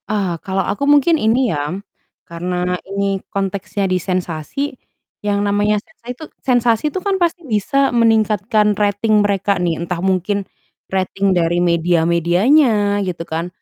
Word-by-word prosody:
Ah, 195 -6 -1
kalau 190 -1 -1
aku 245 - -2
mungkin 290 +3 +5
ini 235 +3 +2
ya, 145 +2 -2 0.6
karena 180 +1 -2 0.2
ini 195 -1 -1
konteksnya 200 +1 -2
di 185 - +3
sensasi, 185 - -3 0.5
yang 205 0 0
namanya 205 +1 +2
sensa 320 -7 -29
itu 250 +5 -6 0.2
sensasi 240 -3 +2
itu 375 - -4
kan 400 -1 +1
pasti 345 -1 0
bisa 270 +4 +1
meningkatkan 215 -2 +2
rating 210 +1 +2
mereka 200 -1 0
nih. 170 -2 0
Entah 170 0 -3
mungkin, 190 +1 0 0.4
rating 190 +1 0
dari 175 +1 +1
media-medianya 180 - +2
gitu 175 -2 -4
kan, 165 +2 -3
200 Hz, 135 wpm, -18 LUFS, 180-220 Hz, 0.6 s, mungkin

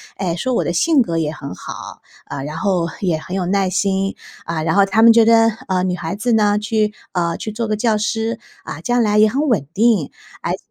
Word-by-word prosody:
哎， 180 -4 -2
说 255 +9 -2
我 - - +1
的 175 - -2
性 295 - +3
格 170 -8 -1
也 155 -2 -1
很 140 -7 -8
好， - - -9 0.3
嗯， 140 -1 -5
然 150 +2 -6
后 180 -1 0 0.2
也 175 -5 +1
很 180 +4 -7
有 185 -2 -1
耐 195 0 +1
心， 195 +1 0 0.3
嗯， 165 -1 -3
然 160 +2 0
后 200 -1 +5
他 200 +3 +1
们 230 0 +8
觉 225 0 +5
得， 225 0 +5 0.2
嗯， 185 0 +1
女 180 - -1
孩 175 +1 -4
子 235 +3 0
呢 210 -1 +3
去 210 0 0 0.2
呃， 170 -2 0
去 215 - -5
做 225 +2 -3
个 215 - 0
教 215 0 +1
师， 225 +2 -2 0.3
嗯， - - -6
将 245 -1 +1
来 210 -2 +2
也 215 +1 +6
很 275 +8 -1
稳 205 - +1
定。 215 -7 +2 0.3
而 - - -1
且， - - -3
200 Hz, 250 characters per minute, -19 LUFS, 175-225 Hz, 0.3 s, 们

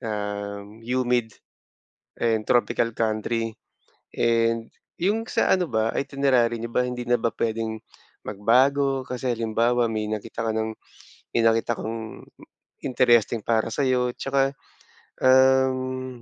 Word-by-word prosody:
um 105 0 -5
humid 120 -1 0 0.9
and 110 -2 +1
tropical 120 -1 +2
country 115 +1 -1 0.6
and 115 -1 +1 0.3
yung 205 +6 +1
sa - - +2
ano 180 -3 -1
ba? 110 0 +1
Itinerary 135 -4 +1
niyo 115 - -5
ba - - +2
hindi 125 -1 -4
na 120 -1 +2
ba 115 - +1
pwedeng 110 -1 -1 0.5
magbago? 130 +6 +2
Kasi 125 0 -4
halimbawa 115 +1 +1
may 110 -1 -2
nakita 110 +1 -4
ka - - +1
ng, 110 0 -1 0.6
may 115 - +1
nakita 115 0 +2
kang 110 0 -6 0.6
interesting 120 -3 +3
para 115 -1 +1
sayo 125 -2 +1
tsaka, 135 0 +1 0.7
um, 130 -1 +3
115 Hz, 120 wpm, -24 LUFS, 110-130 Hz, 0.9 s, interesting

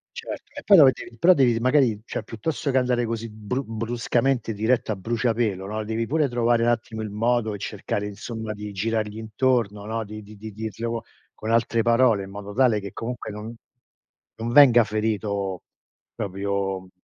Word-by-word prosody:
Certo. - - -7
E 290 - -7
poi 200 -2 +7
dove 140 -5 +8
devi 120 - -10
però 180 +9 +6
devi 125 -7 +3
magari, 125 -4 +3
cioè - - -4
piuttosto 140 +5 -3
che 130 - +2
andare 125 -1 +2
così 115 0 -4
bru 110 +5 -4
bruscamente 115 +2 -1
diretto 110 +2 +1
a 105 - -1
bruciapelo, 110 -2 -1
no, 110 +1 -3
devi 110 +1 -2
pure 155 0 +2
trovare 120 -1 +2
n'attimo 115 -1 0
il 105 - -4
modo 110 0 +1
e 105 - -6
cercare 105 +1 -3
insomma 110 +1 -6
di 105 0 -7
girargli 110 +1 -2
intorno, 110 -2 0
no, 110 +1 -2
di 105 +1 -9
di 105 +1 -13
di 110 +2 -8
dirlo 110 +2 -4 0.3
con 110 - -4
altre 115 0 +2
parole, 115 -3 +4
in 95 - -10
modo 100 0 -7
tale 120 -2 +3
che 100 -1 -7
comunque 120 +2 -5
non 105 +2 -7 0.9
non 115 +1 -2
venga 125 -4 +8
ferito 105 -3 -2 0.5
proprio 100 -2 -3
110 Hz, 175 wpm, -24 LUFS, 105-120 Hz, 0.9 s, dove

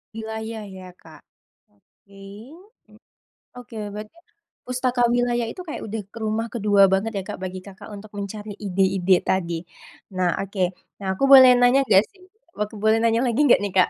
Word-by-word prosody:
wilayah 220 0 -6
ya 185 -1 -11
Kak. 160 -1 -16 0.5
Oke. 195 - -23 1.4
Oke 235 -2 -11 0.2
berarti, 210 +8 -9 0.5
pustaka 250 0 -1
wilayah 240 -1 +1
itu 365 - -9
kayak 305 - -6
udah 220 +1 -4
jadi 225 +3 -12
rumah 220 +2 -1
kedua 205 -3 +3
banget 210 +4 0
ya - - -3
Kak - - -6
bagi 185 0 -5
Kakak 195 +2 -12
untuk 210 +1 -11
mencari 205 +1 -6
ide-ide 190 -2 +1
tadi. 170 -3 -1 0.6
Nah 180 -1 +1
oke. 195 0 -6 0.4
Nah - - -5
aku - - +1
boleh 260 -2 +10
nanya 245 +2 +4
enggak 200 -3 +4
sih? 375 -2 -23 0.3
Aku 210 +1 -4
boleh 220 +1 +3
nanya 230 0 +2
lagi 240 +4 0
enggak 250 - +5
nih, 200 - -3
Kak? 185 - +4
215 Hz, 165 wpm, -23 LUFS, 195-230 Hz, 1.4 s, boleh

